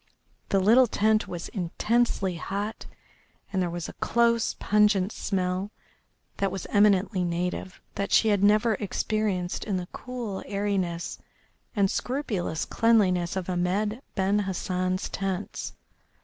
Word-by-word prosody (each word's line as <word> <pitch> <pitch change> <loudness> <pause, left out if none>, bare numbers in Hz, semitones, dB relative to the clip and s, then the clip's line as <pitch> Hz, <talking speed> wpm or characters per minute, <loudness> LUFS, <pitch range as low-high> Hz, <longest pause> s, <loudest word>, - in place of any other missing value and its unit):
The 195 - +3
little 230 +6 +6
tent 215 0 +2
was 175 -1 -5
intensely 195 0 0
hot, 200 +5 -4 0.7
and 190 - +1
there 180 - 0
was 175 -1 -4
a - - -8
close, 235 -1 +2
pungent 210 -2 +3
smell 185 -1 -1 0.7
that 195 -1 0
was 195 -2 -5
eminently 200 -2 +3
native 180 +2 -3
that 200 - -3
she 220 -2 +5
never 210 +3 +4
experienced 205 -3 -1
in 200 -3 -1
the 180 - -3
cool 240 -6 -5
airiness 195 -4 -2 0.6
and 200 -2 +3
scrupulous 220 - -2
cleanliness 190 -7 +2
of 190 -2 -3
Ahmed 190 +6 0
Ben 195 +1 +2
Hassan's 185 -1 -1
tents. 195 0 -4
195 Hz, 120 wpm, -27 LUFS, 185-215 Hz, 0.7 s, little